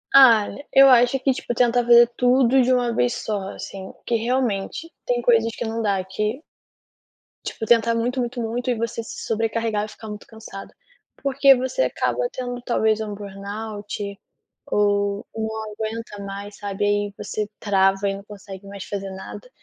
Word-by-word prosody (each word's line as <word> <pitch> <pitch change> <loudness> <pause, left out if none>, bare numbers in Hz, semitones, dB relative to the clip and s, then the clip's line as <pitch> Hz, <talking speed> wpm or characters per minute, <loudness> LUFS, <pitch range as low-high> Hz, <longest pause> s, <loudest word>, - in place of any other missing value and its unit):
Ah, 235 -6 +8 0.3
eu 270 0 +8
acho 245 +1 +5
que 270 +1 +2
tipo 240 - -4
tentar 245 0 +3
fazer 240 0 +8
tudo 255 +1 +4
de 255 +1 +2
uma 245 -2 +2
vez 240 +1 +1
só 200 -3 -3
assim, 190 -1 -8
que 235 - 0
realmente 245 - -1 0.2
tem 245 -1 0
coisas 230 -1 +3
que - - -4
não 225 +1 -2
dá 200 -3 +1
que 215 +7 -3 1.0
tipo, 220 - -4
tentar 230 0 +4
muito, 245 +3 -1
muito, 245 0 -2
muito 235 +3 -2
e 245 - +2
você 230 0 -3
se - - -8
sobrecarregar 225 -1 0
e - - -10
ficar 220 +1 -10
muito 210 0 -8
cansada. 220 -3 -10 0.5
Porque 275 0 +5
você 260 - 0
acaba - - 0
tendo 245 -1 -5
talvez 220 -3 +1
um 210 -1 -4
burnout, 205 0 -6 0.5
ou 205 0 +1
não 220 -1 -4
aguenta 220 -1 -5
mais 200 +1 -7
sabe, 205 0 -3
aí 205 0 0
você 210 0 -4
trava 195 -1 +2
e 195 - -2
não 200 - -9
consegue 200 -1 -10
mais 200 -1 -7
fazer 195 -1 -4
nada. 190 - -9
220 Hz, 170 wpm, -23 LUFS, 205-245 Hz, 1.0 s, Ah